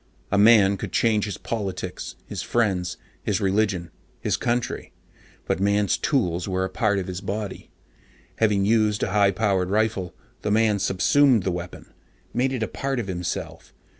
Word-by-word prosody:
A 100 - +2
man 100 -2 +6
could - - -6
change 110 -3 +2
his 105 - -5
politics, 100 -5 -4
his - - -5
friends, 95 -7 0 0.2
his 105 -1 0
religion, 95 -4 0 0.3
his - - 0
country, 120 0 -2 0.5
but - - -1
Man's 100 0 +2
tools 90 - 0
were 95 0 0
a - - -5
part 105 -4 +1
of 95 - -2
his 90 0 -5
body. 100 0 -5 0.7
Having 105 -3 +2
used 105 -1 +2
a - - -1
high 100 0 +4
powered 95 -2 0
rifle, 105 -3 0 0.3
the 105 - -2
man 105 -1 +3
subsumed 110 +5 +3
the 95 - 0
weapon, 90 0 -7 0.4
made 130 +2 +1
it 125 -4 -2
a - - -1
part 135 -2 -3
of 120 - -2
himself. 90 -2 -5
100 Hz, 165 wpm, -24 LUFS, 95-110 Hz, 0.7 s, man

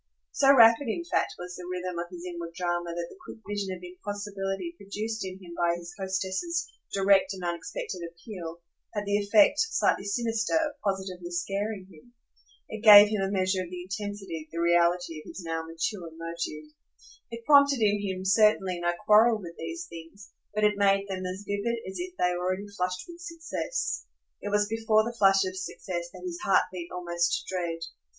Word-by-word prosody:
So 275 -1 +5
rapid 235 0 +7
in 285 +10 -2
fact - - 0
was 180 0 -7
the 180 - -8
rhythm 180 -1 -3
of 175 0 -4
his 175 -1 -9
inward 170 -2 -6
drama 175 -1 -1
that 170 0 -2
the 380 - -15
quick - - -9
vision 205 -1 -2
of 180 -1 -7
impossibility 200 - -5
produced 215 -1 -4
in 185 -1 -5
him 180 -3 -11
by 170 0 +2
his 175 0 -9
hostess's 190 - -2 0.2
direct 195 0 +4
and 185 - -8
unexpected 175 +1 -4
appeal 170 -1 -9 0.3
had 205 0 -2
the 205 0 +2
effect, 205 +7 +5
slightly 450 - +2
sinister, 225 +3 0
of 305 -3 0
positively 190 -3 -3
scaring 195 +3 -2
him. 240 +10 -19 0.5
It 220 -1 -7
gave 210 -2 +10
him 210 -2 -1
a 195 - 0
measure 190 -1 +1
of 180 - -6
the 180 0 -6
intensity, 190 -4 -5
the 165 - -7
reality 170 -1 +2
of - - -16
his 190 - -8
now 165 0 -2
mature 165 +2 -3
motive. 165 -2 -5 0.6
It 230 -1 -8
prompted 280 -3 +6
in 205 -1 +3
him 190 -2 -3
certainly 195 -3 +3
no 175 0 +1
quarrel 220 +2 +6
with 170 -4 -8
these 340 0 -5
things, 195 - -12 0.2
but 215 - 0
it 210 -1 +3
made 195 0 +3
them 185 -1 -3
as 190 +2 -6
vivid 205 +4 -1
as 190 - -6
if 365 0 -7
they 180 0 +2
already 185 +3 -2
flushed 180 -1 -2
with 345 0 -11
success. 340 +8 -3 0.3
It 205 - -4
was 205 0 +2
before 220 0 +2
the 235 +2 -4
flush 195 -3 +5
of 185 0 -4
success 180 -2 -5
that 180 0 -11
his 175 -1 -4
heart 195 - +4
beat 175 -2 -6
almost 175 -1 -1
to - - -7
dread. 170 -2 -2
195 Hz, 185 wpm, -28 LUFS, 175-215 Hz, 0.6 s, gave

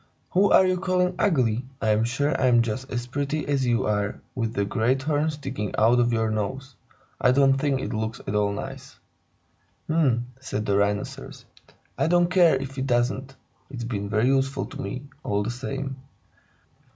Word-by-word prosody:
"Who 195 +2 +4
are 190 - +7
you 185 -1 +1
calling 185 -1 +1
ugly? 125 - +2 0.2
I 110 - 0
am 110 +1 +3
sure 145 +6 0
I'm 120 -2 +5
just 120 +4 -4
as 120 -1 -2
pretty 145 +4 -2
as 135 -3 +1
you 120 -1 +1
are, 105 -1 -1
with 115 -2 -3
that 100 - +1
great 125 +4 +1
horn 150 +1 +1
sticking 135 -9 -4
out 115 +3 +4
of 120 0 +3
your 110 -1 +1
nose. 130 +5 -3 0.5
I - - +5
don't 135 +1 +5
think 135 0 0
it - - -4
looks 110 0 -3
at - - -3
all 105 -1 +2
nice." 100 - -7 0.9
"H'm!" 135 -7 +2
said 120 -5 -4
the 100 - +1
Rhinoceros. 100 0 -2 0.5
"I - - +2
don't 175 +1 +3
care 175 -5 +5
if 135 0 -5
it 130 - -2
doesn't. 130 +2 0 0.3
It's 125 -4 -6
been 100 -4 -3
very 110 +2 +2
useful 135 0 +1
to - - -8
me, 125 +7 -5 0.2
all 100 0 0
the 115 - -2
same." 135 +2 -5
130 Hz, 180 wpm, -25 LUFS, 110-140 Hz, 0.9 s, are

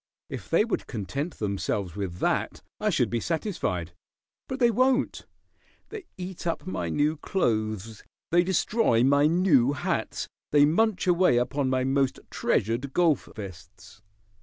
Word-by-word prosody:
If - - -7
they 215 - +3
would 235 - -3
content 140 - -4
themselves 100 -3 -2
with 95 -4 -4
that - - -1 0.2
I - - +1
should - - +1
be 120 - 0
satisfied. 110 - -2 0.5
But 260 - -4
they 240 -3 +4
won't. 255 +4 +1 0.6
They 430 -4 -8
eat 180 -1 -6
up 165 - -2
my 90 - -3
new 150 - +1
clothes; 110 - -2 0.3
they 175 +1 +5
destroy 190 - +2
my 140 +2 +4
new 155 -6 +3
hats; 145 - -2 0.2
they 145 -1 +6
munch 195 +6 +2
away 180 -7 +4
upon 135 +2 0
my 130 0 +1
most 135 0 +1
treasured 120 +6 0
golf 165 -6 +2
vests. 95 0 -11
140 Hz, 140 wpm, -27 LUFS, 110-180 Hz, 0.6 s, they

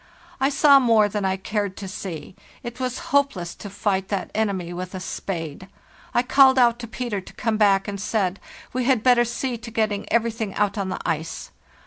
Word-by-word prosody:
I 270 +1 +3
saw 280 0 +6
more 225 -5 +4
than 205 -1 -2
I 190 0 0
cared 205 0 -3
to 195 - -6
see; 180 -3 -7 0.3
it 240 +1 -7
was 255 +1 -4
hopeless 240 -12 +1
to 205 - -9
fight 195 -1 -1
that 200 -2 -3
enemy 195 -5 -1
with 180 +2 -6
a - - -4
spade. 175 -2 -5 0.4
I 240 - +2
called 265 +1 +6
out 240 -2 +4
to 235 - -6
Peter 225 -3 -3
to - - -14
come 220 -1 -1
back, 200 -2 +3
and 200 -1 -4
said, 200 -3 -1 0.3
'We 255 0 -1
had 250 -4 +2
better 245 -2 +5
see 240 +1 -3
to 230 - -8
getting 215 -3 -1
everything 225 -3 0
out 205 -1 +1
on 200 -2 -2
to - - -2
the - - -6
ice. 160 0 -3
210 Hz, 200 wpm, -23 LUFS, 190-240 Hz, 0.4 s, saw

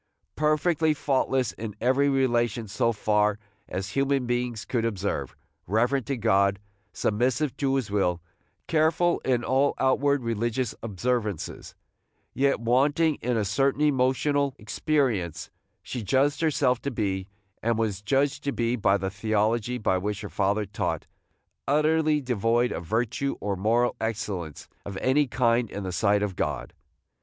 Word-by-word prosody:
Perfectly 155 +1 +2
faultless 135 -3 0
in 110 -2 -7
every 130 +4 +3
relation 120 -4 +1
so 115 +4 +1
far 105 -1 +1 0.3
as 95 +2 -4
human 135 0 +1
beings 120 -2 -2
could 120 -3 -1
observe, 100 -3 -2 0.3
reverent 120 +5 +1
to 135 - -1
God, 100 -3 +3 0.3
submissive 125 +6 0
to 135 -1 +1
his 130 -7 -2
will, 90 -4 +1 0.5
careful 165 +2 +2
in 125 -2 0
all 135 +3 +2
outward 140 +1 +2
religious 115 +1 -1
observances, 110 -2 -3 0.6
yet 140 -2 +2
wanting 140 +7 +2
in 120 0 0
a 105 - 0
certain 135 +8 +1
emotional 140 0 +2
experience, 105 - -1 0.3
she 125 - -5
judged 135 - +1
herself 130 -6 +2
to 140 - -2
be, 95 -6 -2 0.3
and 115 0 +1
was 105 -4 -1
judged 140 +6 0
to 140 - +1
be 120 -2 0
by 100 -4 +2
the 95 0 -3
theology 110 +3 0
which 100 -1 -1
her - - -6
father 100 +1 0
taught, 100 +1 -3 0.6
utterly 155 +1 +3
devoid 120 -2 +1
of - - -4
virtue 120 +6 -1
or 100 0 -2
moral 115 +6 +1
excellence 100 -9 -4 0.2
of 100 -1 -6
any 140 +5 +2
kind 120 -2 +1
in 100 - -5
the 95 - -3
sight 105 +2 +2
of 100 -3 -2
God. - - -3
120 Hz, 140 wpm, -26 LUFS, 105-135 Hz, 0.6 s, every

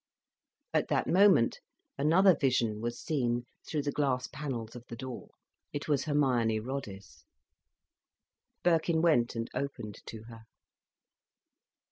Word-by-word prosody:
At - - +2
that - - +1
moment 185 - +4 0.4
another 170 +6 +5
vision 120 -6 +1
was 120 +1 -3
seen 120 -6 -1 0.3
through 150 -2 -1
the 145 - -1
glass 135 -3 0
panels 125 -6 -5
of 120 - -9
the 115 - -7
door. 130 +1 -7 0.4
It 145 - -4
was 145 -2 +1
Hermione 125 -7 +2
Roddice. 110 -5 -7 1.4
Birkin 165 -1 +2
went 120 -9 +3
and 115 0 -2
opened 110 -7 -4
to 110 -1 -8
her. 115 -1 -12
130 Hz, 120 wpm, -31 LUFS, 115-150 Hz, 1.4 s, another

